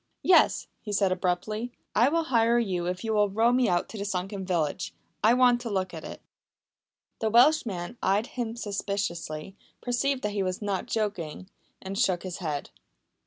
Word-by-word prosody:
"Yes," 360 -2 +5 0.2
he 210 - -6
said 200 -2 +2
abruptly. 190 +6 -1 0.2
"I 240 +5 +5
will 330 +2 +1
hire 235 -5 +3
your 185 -7 0
boat - - 0
if 180 +3 -4
you 220 -1 -1
will 210 -1 +3
row 225 +4 +3
me 250 -3 +3
out 175 -1 +1
to 220 - -7
the - - -2
sunken 195 0 -3
village. 170 -1 -1 0.3
I 225 +3 +6
want 245 -1 +4
to 235 - -4
look 185 -3 -1
at 160 -1 -7
it." - - -9 1.0
The 220 - +1
Welshman 235 - +3
eyed 200 +4 +2
him 235 -3 -4
suspiciously, 195 -6 -3 0.2
perceived 255 +2 0
that 210 - 0
he 205 -1 -1
was 185 -1 -2
not 200 -3 -2
joking, 190 -5 -3 0.3
and 195 +1 -4
shook 180 -2 +2
his 185 -2 -5
head. 150 -5 -3
205 Hz, 180 wpm, -27 LUFS, 185-235 Hz, 1.0 s, I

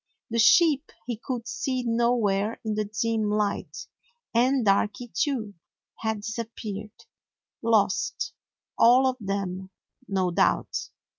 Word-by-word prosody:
The 230 - 0
sheep 300 +5 +5
he 240 -1 -3
could 235 +1 -5
see 255 -2 -2
nowhere 230 -3 +1
in 215 - 0
the 215 0 -1
dim 215 +1 -1
light, 210 -1 -2 0.5
and 250 +1 +3
Darky, 205 +4 +1
too, 220 - -1 0.5
had 220 -2 -2
disap 225 +1 -4
peared. 210 -1 -7 0.6
Lost, 225 +5 +1 0.5
all 250 +3 +6
of 260 -1 +1
them, 195 -2 -3 0.4
no 190 -2 0
doubt. - - +1
220 Hz, 120 wpm, -26 LUFS, 205-240 Hz, 0.6 s, all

